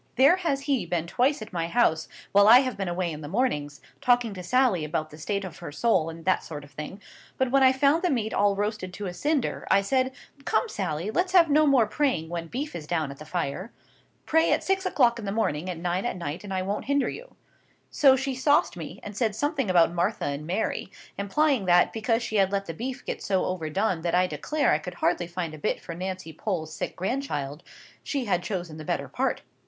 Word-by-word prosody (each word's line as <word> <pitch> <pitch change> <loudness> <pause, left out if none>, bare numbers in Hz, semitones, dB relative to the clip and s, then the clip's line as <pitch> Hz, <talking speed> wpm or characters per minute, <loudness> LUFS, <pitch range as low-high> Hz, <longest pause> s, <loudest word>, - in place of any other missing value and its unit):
There 275 +8 +6
has 310 -7 -1
he 275 - 0
been 170 -1 -1
twice 250 - +1
at 215 - -13
my 165 -1 -1
house, 170 -6 +2 0.2
while 200 +1 +6
I 240 +4 +9
have 255 -2 -2
been 195 -1 -3
away 175 0 -1
in 150 0 -7
the 145 - -7
mornings, 150 - -1 0.2
talking 245 -3 +3
to 185 - -7
Sally 235 -3 +2
about 155 0 -3
the 150 - -11
state 200 +4 -2
of 175 -3 -9
her 170 - -7
soul 165 -2 +1
and 165 0 -10
that 185 - +2
sort 150 -3 -7
of 145 - -15
thing. 150 +8 -7 0.4
But 260 -1 +1
when 275 0 +4
I 260 -1 +7
found 280 +5 +3
the 360 - +1
meat 225 -7 -1
all 200 0 +3
roasted 205 -2 -3
to 205 - -5
a 180 - -4
cinder, 290 - -1
I 200 - +5
said, 260 +5 +1 0.3
'Come, 475 - +1
Sally, 185 - -3
let's 365 +7 0
have 335 -5 +6
no 305 +1 +5
more 265 -5 +5
praying 255 - 0
when 170 -1 -4
beef 280 - -4
is 155 -3 -6
down 160 -4 -1
at 140 - -11
the 155 - -9
fire. 175 +5 -3 0.5
Pray 320 +1 +3
at - - +2
six 380 0 0
o'clock 235 -9 +3
in 220 - -6
the 195 - -2
morning 185 -6 -1
and 170 -1 -5
nine 180 +2 0
at 240 - -2
night, 170 +1 -5
and 205 - -8
I 185 -1 -1
won't 200 +2 -3
hinder 280 -2 +1
you.' - - -8 0.6
So 270 -3 +6
she 270 +1 -2
sauced 260 - +2
me, 170 +2 -8
and 205 - -8
said 215 -1 0
something 280 - -1
about 170 -2 +4
Martha 175 +5 0
and 145 +2 -3
Mary, 190 +1 -2 0.2
implying 255 +3 +1
that, 175 -1 +4
because 225 +1 0
she 220 - -2
had 195 -1 +3
let 200 0 -1
the 165 - -5
beef 250 - -5
get - - -4
so 190 -2 0
overdone 185 +1 -1
that 170 +1 0
I 180 +1 +4
declare 300 +10 0
I 150 - +3
could 180 +3 -7
hardly 175 0 0
find 175 -2 -4
a 155 - -9
bit - - -1
for 170 - -8
Nancy 185 -1 -5
Pole's 160 -3 -3
sick - - -4
grandchild, 175 - -3 0.4
she 275 -4 -2
had 185 -4 +1
chosen 175 -6 -4
the 155 - -7
better - - -2
part. - - -1
195 Hz, 235 wpm, -26 LUFS, 170-255 Hz, 0.6 s, I